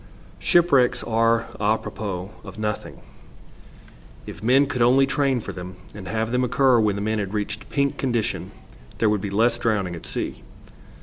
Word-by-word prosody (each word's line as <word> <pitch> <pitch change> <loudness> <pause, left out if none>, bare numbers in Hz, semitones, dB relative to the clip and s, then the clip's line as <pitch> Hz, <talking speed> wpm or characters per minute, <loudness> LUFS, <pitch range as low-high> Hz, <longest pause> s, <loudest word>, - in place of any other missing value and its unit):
Shipwrecks 135 -8 +3
are 115 0 +2
√Ý 110 +1 +1
propos 95 -3 -5
of - - -10
nothing. 105 -1 -4 1.2
If - - -9
men 130 +5 +4
could 135 -3 -3
only 130 +3 +5
train 135 -1 +1
for - - -7
them 90 0 -8 0.2
and 100 -2 -9
have 110 +3 -2
them 125 +1 +1
occur 125 0 +3
when 105 -2 +2
the 100 - -3
men 110 0 0
had 100 0 -3
reached 105 -1 -4
pink 140 -1 0
condition, 120 -5 -1 0.5
there 110 - +3
would 105 -2 0
be 100 - -3
less 115 +4 +2
drowning 100 -7 0
at 85 - -9
sea. - - -4
115 Hz, 170 wpm, -23 LUFS, 105-125 Hz, 1.2 s, only